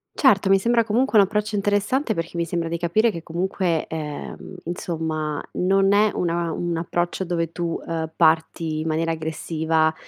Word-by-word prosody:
Certo, 200 -8 +4
mi 195 - +6
sembra 235 +4 +2
comunque 230 +1 +3
un 200 - +7
approccio 210 +1 -2
interessante, 205 +5 +1
perché 165 +1 -4
mi 170 - 0
sembra 165 0 -2
di 170 0 -2
capire 215 +7 +2
che 170 -4 -6
comunque, 175 0 -1
ehm, 150 -2 -6
insomma 160 -3 -3
non 195 +2 +3
è 210 +1 +5
una 170 -1 0
un 175 +1 -2
approccio 175 +2 -1
dove 170 -2 -2
tu, 170 0 -3
ehm, 160 -1 -3
parti 160 -1 +2
in 160 - -3
maniera 165 +1 0
aggressiva, 160 0 0
170 Hz, 165 wpm, -23 LUFS, 160-195 Hz, -, un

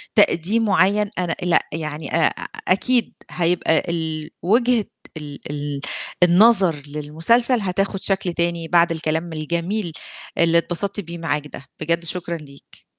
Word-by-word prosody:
تقديم 205 +2 +3
معيّن، 200 +1 +2
أنا 175 -2 -1
لأ، 175 -2 +2
يعني 155 -2 -3
آآ 165 - +3 0.3
أكيد 235 +5 +2 0.2
هيبقى 170 -2 +1
ال 160 -2 -3
وجهة 235 +3 +2 0.3
ال 145 -2 -8
ال 145 -1 -4 0.4
النظر 190 -1 +6
للمسلسل 165 - +2
هتاخُد 195 0 -1
شكل 190 -3 0
تاني 170 -1 -1
بعد 170 0 +4
الكلام 160 +1 -2
الجميل 170 +4 -2 0.5
اللي 170 0 +4
اتبسطت 190 +4 -1
بيه 170 -2 -7
معاك 150 -2 -2
ده، 140 - -11
بجد 170 +2 -1
شكرًا 170 0 -3
ليك. 140 -2 -16
170 Hz, 130 wpm, -21 LUFS, 160-195 Hz, 0.5 s, النظر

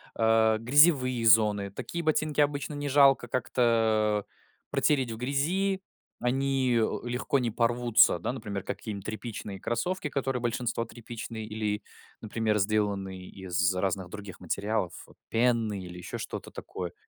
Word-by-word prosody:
а, 110 -1 +4
грязевые 130 0 +4
зоны, 105 -2 +5
такие 170 +11 -5
ботинки 155 -1 +1
обычно 145 0 0
не 145 0 -3
жалко 135 -3 +5
как-то, 110 -4 +1 0.5
протереть 135 -5 +2
в 110 - -5
грязи, 175 - 0 0.4
они, 130 0 +1
э, 110 - +1
легко 125 +3 0
не 120 -3 -1
порвутся, 120 -3 +4
да, 85 - -3
например, 105 -6 -5
какие-нибудь 100 -2 -6
тряпичные 110 -3 -6
кроссовки, 150 - -2
которые 135 -3 -2
большинство 120 -1 -1
тряпичные 115 -1 -7
или, 105 -1 -3 0.4
например, 110 0 0
сделанные 100 -2 -1
из 95 0 0
разных 95 -1 -1
других 100 -2 -9
материалов, 100 +1 -2 0.4
пены 115 -3 +1
или 90 0 -9
еще 90 - -6
что-то - - -6
такое. 90 -1 -6
115 Hz, 130 wpm, -28 LUFS, 105-130 Hz, 0.5 s, зоны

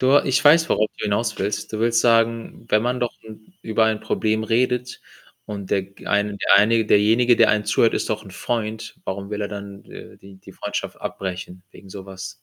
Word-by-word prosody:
Du, 130 - +3
äh, - - +3
ich 135 - +1
weiß, 160 +3 +6
worauf 110 0 +1
du - - -4
hinauswillst. 105 -1 -2
Du 110 - -3
willst 115 0 +2
sagen, 115 0 +1
wenn 105 +1 +3
man 125 +1 -1
doch 120 -1 -1
’n 110 +7 -14
über 110 0 +1
ein 110 -1 0
Problem 110 0 -1
redet 125 +2 -1 0.5
und 100 -3 -7
der 95 - +1
g 100 +1 -16
eine 100 0 0
der - - +4
eine 110 +3 +4
derjenige, 115 +4 +4
der 115 - +5
einen 105 -1 0
zuhört, 115 - +2
ist - - -2
doch 110 0 -3
’n 95 - -12
Freund, 110 +2 -4
Warum 100 +1 -5
will 105 0 -4
er 100 - -2
dann 100 -1 -8
d - - -17 0.2
äh, - - -20
die 95 0 -15
die 95 - -15
Freundschaft - - -5
abbrechen 90 -1 -6
wegen 100 - -15
so 95 0 -9
was? 95 0 -9
110 Hz, 215 wpm, -22 LUFS, 100-115 Hz, 0.5 s, weiß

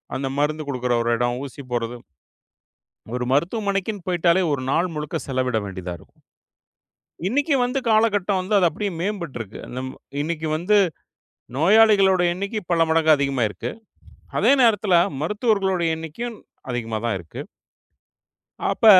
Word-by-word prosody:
அந்த 135 0 -2
மருந்து 155 +1 0
குடுக்கற 125 -2 -1
ஒரு 120 - +1
எடம், 120 +1 0
ஊசி 140 +1 -9
போடுறது. 120 0 -2 1.2
ஒரு 125 - -2
மருத்துவமனைக்குனு 200 +3 -1
போயிட்டாலே, 175 +1 +3
ஒரு 140 -3 -1
நாள் 175 +1 +1
முழுக்க 150 -1 -3
செலவிட 130 -3 0
வேண்டியதா 95 -2 -6
இருக்கு. - - -21 1.1
இன்னைக்கு 285 +6 +1
வந்து 250 +2 0
காலகட்டம் 210 -3 +2
வந்து 190 +3 0
அது 180 -3 +5
அப்டியே 200 +5 -2
மேம்பட்டுருக்கு. 170 - -4 0.2
நம் 130 +1 -4 0.3
இன்னைக்கு 160 0 -2
வந்து 180 +6 +2 0.8
நோயாளிகளுடைய 190 -1 +5
எண்ணிக்கை 200 +3 -3
பல 165 -1 +4
மடங்கு 160 -1 +4
அதிகமாயிருக்கு. 130 -9 -1 0.7
அதே - - +5
நேரத்துல 205 -5 +3 0.3
மருத்துவர்களுடைய 195 -2 +1
எண்ணிக்கையும் 210 +9 -6 0.3
அதிகமா 115 -2 -3
தான் 115 - 0
இருக்கு. 85 - -8 1.3
அப்ப - - 0
170 Hz, 125 wpm, -23 LUFS, 130-205 Hz, 1.3 s, அது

